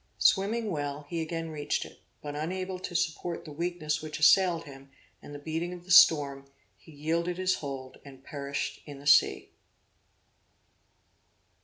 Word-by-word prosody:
Swimming 215 Hz, +2 st, +2 dB
well 145 Hz, -2 st, -4 dB
he 170 Hz, -1 st, -2 dB
again 165 Hz, 0 st, -4 dB
reached 150 Hz, -1 st, -2 dB
it; -, -, -14 dB, 0.2 s
but 145 Hz, -1 st, -5 dB
unable 185 Hz, +4 st, -3 dB
to 180 Hz, -1 st, -7 dB
support 170 Hz, +1 st, -2 dB
the 155 Hz, -, -9 dB
weakness 160 Hz, -1 st, -2 dB
which 155 Hz, -1 st, -6 dB
assailed 170 Hz, +2 st, +5 dB
him, 135 Hz, -2 st, -13 dB, 0.3 s
and -, -, -11 dB
the 145 Hz, -, -7 dB
beating 160 Hz, +4 st, -4 dB
of 175 Hz, -1 st, -10 dB
the 180 Hz, -, -7 dB
storm, 140 Hz, -5 st, +6 dB, 0.3 s
he 160 Hz, -, -18 dB
yielded 165 Hz, +4 st, -2 dB
his 185 Hz, 0 st, +1 dB
hold 135 Hz, -3 st, -7 dB
and 135 Hz, -2 st, -14 dB
perished 140 Hz, -1 st, -4 dB
in 145 Hz, -1 st, -8 dB
the 140 Hz, -, -13 dB
sea. 140 Hz, -1 st, +4 dB
155 Hz, 155 wpm, -29 LUFS, 145-175 Hz, 0.3 s, storm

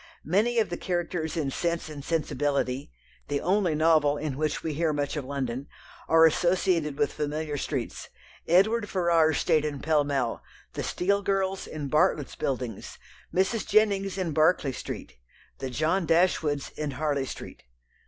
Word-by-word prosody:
Many 215 Hz, +9 st, +2 dB
of 220 Hz, -6 st, +2 dB
the 175 Hz, -, -2 dB
characters 175 Hz, -2 st, -2 dB
in 145 Hz, -4 st, -1 dB
Sense 170 Hz, +3 st, -1 dB
and 150 Hz, -3 st, -8 dB
Sensibility 140 Hz, -, -1 dB, 0.4 s
the 145 Hz, -1 st, -1 dB
only 180 Hz, -1 st, +1 dB
novel 155 Hz, -2 st, +3 dB
in 145 Hz, -2 st, -3 dB
which 155 Hz, +1 st, -2 dB
we 160 Hz, -, -2 dB
hear 160 Hz, +1 st, +1 dB
much 145 Hz, 0 st, -2 dB
of 145 Hz, -3 st, -3 dB
London 135 Hz, -1 st, -3 dB, 0.4 s
are 165 Hz, 0 st, +7 dB
associated 170 Hz, -2 st, +2 dB
with 145 Hz, -, +1 dB
familiar 150 Hz, 0 st, -3 dB
streets. 135 Hz, -3 st, -4 dB, 0.4 s
Edward 205 Hz, +5 st, +3 dB
Ferrars 165 Hz, -5 st, +3 dB
stayed 155 Hz, -, +2 dB
in 150 Hz, -2 st, -3 dB
Pall 155 Hz, 0 st, +2 dB
Mall, 135 Hz, -5 st, -1 dB, 0.3 s
the -, -, -3 dB
Steele 200 Hz, +3 st, 0 dB
girls 195 Hz, -1 st, -1 dB
in 150 Hz, -2 st, -5 dB
Bartlett's 150 Hz, -1 st, +1 dB
Buildings, 125 Hz, -5 st, -4 dB, 0.3 s
Mrs. 190 Hz, +4 st, +1 dB
Jennings 200 Hz, -2 st, +2 dB
in 180 Hz, -4 st, -1 dB
Berkeley 155 Hz, -2 st, +3 dB
Street, -, -, -7 dB, 0.4 s
the 135 Hz, -, -3 dB
John 160 Hz, +7 st, 0 dB
Dashwoods 160 Hz, -4 st, +2 dB
in 150 Hz, -1 st, -3 dB
Harley 145 Hz, -3 st, 0 dB
Street. -, -, -8 dB
155 Hz, 155 wpm, -27 LUFS, 145-180 Hz, 0.4 s, are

